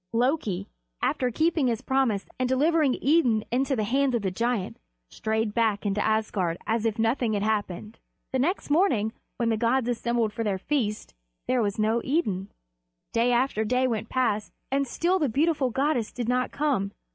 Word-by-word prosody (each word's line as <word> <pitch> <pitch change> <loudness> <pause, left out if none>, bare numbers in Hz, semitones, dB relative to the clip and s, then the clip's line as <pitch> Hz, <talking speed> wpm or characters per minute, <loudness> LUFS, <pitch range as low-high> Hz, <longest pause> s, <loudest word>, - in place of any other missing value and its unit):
Loki, 230 - 0 0.4
after 250 - +1
keeping 315 +2 +1
his 230 -3 -1
promise 260 -7 +1
and 255 -1 0
delivering 295 +1 +3
Idun 265 -8 +3
into 270 +3 +1
the 220 - 0
hands 260 +4 +1
of 230 - -1
the 190 - 0
giant, 230 0 -1 0.3
strayed 220 -1 -1
back 220 -3 +1
into 205 +1 0
Asgard 210 -6 0
as 225 0 0
if 220 -2 0
nothing 225 0 +1
had 205 -1 0
happened. 210 0 -2 0.3
The 260 - 0
next 315 +3 -1
morning, 255 - +2 0.2
when 235 -1 +1
the 225 - +1
gods 235 +2 +1
assembled 235 -2 0
for 230 - -2
their 200 -3 0
feast, 215 -1 -2 0.3
there 255 -1 +2
was 205 -2 -1
no 220 +2 +1
Idun. 210 - 0 0.7
Day 235 +1 +3
after 240 -2 +1
day 250 +4 +1
went 225 -3 -2
past, 220 -5 0 0.2
and 275 0 +1
still 355 +9 +1
the 295 -5 +1
beautiful 290 +1 +1
goddess 260 -2 0
did 240 -2 -4
not 250 +1 +1
come. 265 -10 0
235 Hz, 175 wpm, -26 LUFS, 215-265 Hz, 0.7 s, delivering